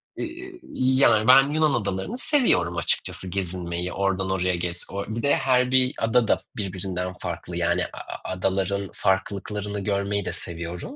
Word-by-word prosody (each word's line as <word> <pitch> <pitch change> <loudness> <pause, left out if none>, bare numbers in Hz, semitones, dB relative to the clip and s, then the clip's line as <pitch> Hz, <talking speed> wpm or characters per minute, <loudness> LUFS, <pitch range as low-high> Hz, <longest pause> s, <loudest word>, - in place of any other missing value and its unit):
Eee, 360 +2 -7
yani, 130 -4 +4
ben 135 +2 +8
Yunan 155 -2 +3
adalarını 100 - -2
seviyorum 235 - +2
açıkçası 85 +2 -1
gezinmeyi, 90 -1 -3
oradan 95 -1 0
oraya 90 -1 +1
gez. 85 0 -4
O 100 0 -3
bir 110 +2 -4
de 140 - +4
her 125 -1 +2
bir 130 +1 +4
ada 115 +1 +2
da - - +3 0.2
birbirinden 95 -2 -3
farklı. 85 0 -5
Yani, 85 +1 +1
a - - -11
a - - -8
adaların 95 +1 -1
farklılıklarını 100 +2 -1
görmeyi 100 0 -1
de - - -2
seviyorum. 85 +1 -6
100 Hz, 155 wpm, -25 LUFS, 90-125 Hz, 0.2 s, ben